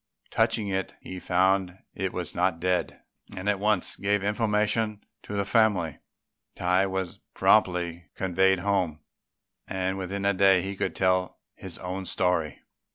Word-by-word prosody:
Touching 115 Hz, -2 st, +1 dB
it, 95 Hz, -1 st, -2 dB
he 95 Hz, -, -8 dB
found 95 Hz, 0 st, +1 dB, 0.2 s
it 95 Hz, -1 st, -2 dB
was 90 Hz, -1 st, -4 dB
not 90 Hz, -1 st, +1 dB
dead, 90 Hz, +1 st, -1 dB, 0.3 s
and 95 Hz, +2 st, -5 dB
at 105 Hz, -1 st, +2 dB
once 105 Hz, -2 st, +1 dB
gave 100 Hz, 0 st, +1 dB
information 105 Hz, 0 st, +1 dB, 0.2 s
to -, -, -8 dB
the 100 Hz, -1 st, 0 dB
family. 100 Hz, -, +2 dB, 0.6 s
Tai 90 Hz, +2 st, +2 dB
was 95 Hz, -2 st, -3 dB, 0.2 s
promptly 90 Hz, -4 st, +2 dB
conveyed 95 Hz, 0 st, +2 dB
home, 90 Hz, -6 st, 0 dB, 0.7 s
and 95 Hz, 0 st, -2 dB
within 100 Hz, +2 st, -3 dB
a 100 Hz, -, +3 dB
day 95 Hz, -1 st, +4 dB
he 100 Hz, +1 st, -4 dB
could -, -, -2 dB
tell 95 Hz, -1 st, +1 dB, 0.2 s
his 95 Hz, -3 st, -6 dB
own 95 Hz, +1 st, -5 dB
story. 90 Hz, -4 st, 0 dB
95 Hz, 145 wpm, -27 LUFS, 90-100 Hz, 0.7 s, day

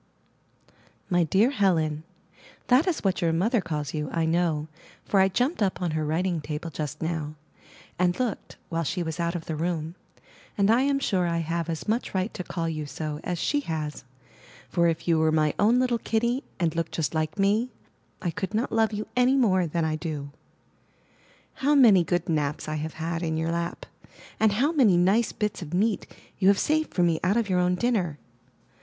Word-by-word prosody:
My 175 Hz, -1 st, +4 dB
dear 195 Hz, -, +3 dB
Helen: 160 Hz, -, +1 dB, 0.7 s
That 260 Hz, +8 st, +5 dB
is 355 Hz, -, -1 dB
what 190 Hz, -2 st, +1 dB
your 170 Hz, -1 st, +2 dB
mother 205 Hz, +8 st, +1 dB
calls 150 Hz, -4 st, -4 dB
you, 150 Hz, -2 st, -3 dB
I 165 Hz, -1 st, 0 dB
know, 160 Hz, -2 st, 0 dB, 0.4 s
for 200 Hz, -, +2 dB
I 190 Hz, -, +6 dB
jumped 250 Hz, -, 0 dB
up 195 Hz, -2 st, +1 dB
on 175 Hz, -3 st, -1 dB
her 155 Hz, 0 st, -1 dB
writing 165 Hz, +2 st, 0 dB
table 150 Hz, +2 st, -5 dB
just 150 Hz, +1 st, -5 dB
now, 160 Hz, -2 st, -3 dB, 0.6 s
and 180 Hz, +2 st, +2 dB
looked, 245 Hz, -5 st, -3 dB
while 165 Hz, 0 st, -1 dB
she 175 Hz, +3 st, -2 dB
was 160 Hz, +1 st, -5 dB
out 170 Hz, +1 st, -1 dB
of 165 Hz, -, -5 dB
the 160 Hz, -, -3 dB
room; 165 Hz, 0 st, -2 dB, 0.6 s
and 200 Hz, +1 st, +4 dB
I 235 Hz, +3 st, +4 dB
am 280 Hz, 0 st, +2 dB
sure 190 Hz, -10 st, 0 dB
I 170 Hz, 0 st, 0 dB
have 165 Hz, 0 st, -2 dB
as 160 Hz, +4 st, -4 dB
much 220 Hz, -1 st, -1 dB
right 190 Hz, +3 st, -1 dB
to 180 Hz, -, -5 dB
call 165 Hz, -1 st, -3 dB
you 155 Hz, -2 st, -3 dB
so 150 Hz, 0 st, -5 dB
as 180 Hz, -, -2 dB
she 290 Hz, -, +1 dB
has, 155 Hz, -, -4 dB, 0.7 s
for 170 Hz, -1 st, +2 dB
if 165 Hz, 0 st, -2 dB
you 165 Hz, -2 st, +3 dB
were 160 Hz, 0 st, +3 dB
my 155 Hz, -1 st, +2 dB
own 225 Hz, +4 st, +4 dB
little 250 Hz, -2 st, +1 dB
kitty, 235 Hz, +5 st, 0 dB, 0.2 s
and 170 Hz, -2 st, 0 dB
looked 165 Hz, 0 st, -2 dB
just 160 Hz, -1 st, -1 dB
like 155 Hz, -1 st, -1 dB
me, 210 Hz, +5 st, +2 dB, 0.5 s
I 175 Hz, -, 0 dB
could 205 Hz, +2 st, -4 dB
not 230 Hz, +4 st, 0 dB
love 225 Hz, -1 st, +2 dB
you 210 Hz, +1 st, -3 dB
any 250 Hz, +2 st, +4 dB
more 185 Hz, -9 st, +3 dB
than 165 Hz, +1 st, -1 dB
I 155 Hz, 0 st, -1 dB
do. 150 Hz, -3 st, -5 dB, 1.3 s
How 290 Hz, +2 st, +3 dB
many 220 Hz, -10 st, +7 dB
good 175 Hz, +1 st, -1 dB
naps 150 Hz, -3 st, -1 dB
I 155 Hz, 0 st, -2 dB
have 155 Hz, +1 st, -4 dB
had 165 Hz, +1 st, -3 dB
in 160 Hz, -2 st, -1 dB
your 160 Hz, +1 st, -1 dB
lap! 170 Hz, 0 st, -3 dB, 0.5 s
and 220 Hz, -2 st, +4 dB
how 270 Hz, +9 st, +2 dB
many 240 Hz, -, +4 dB
nice 195 Hz, +6 st, +3 dB
bits 210 Hz, -3 st, -3 dB
of 170 Hz, 0 st, -5 dB
meat 210 Hz, +2 st, +1 dB, 0.3 s
you 190 Hz, -, +3 dB
have 200 Hz, 0 st, +6 dB
saved 310 Hz, +5 st, +1 dB
for 180 Hz, -, +1 dB
me 165 Hz, -2 st, +2 dB
out 195 Hz, +5 st, +2 dB
of 230 Hz, -3 st, +1 dB
your 180 Hz, -1 st, +2 dB
own 180 Hz, 0 st, +2 dB
dinner! 185 Hz, -9 st, 0 dB
175 Hz, 200 wpm, -26 LUFS, 160-215 Hz, 1.3 s, many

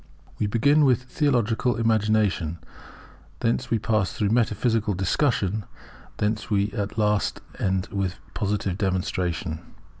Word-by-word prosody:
We 105 Hz, -, +1 dB
begin 140 Hz, +8 st, +4 dB
with 125 Hz, -3 st, +3 dB
theological 125 Hz, -3 st, +1 dB
Imagination, 110 Hz, -7 st, +1 dB, 0.8 s
thence 115 Hz, +2 st, 0 dB
we 115 Hz, -, +2 dB
pass 105 Hz, -3 st, 0 dB
through 105 Hz, -2 st, 0 dB
metaphysical 110 Hz, -2 st, +1 dB
Discussion, 105 Hz, +1 st, +1 dB, 0.5 s
and 105 Hz, +1 st, 0 dB
we 100 Hz, 0 st, +1 dB
end -, -, -19 dB
at 105 Hz, -1 st, -3 dB
last 105 Hz, -1 st, +1 dB, 0.5 s
with 95 Hz, -2 st, -1 dB, 0.2 s
positive 100 Hz, -2 st, -1 dB
Demonstration. 90 Hz, -4 st, -1 dB
105 Hz, 115 wpm, -25 LUFS, 100-115 Hz, 0.8 s, begin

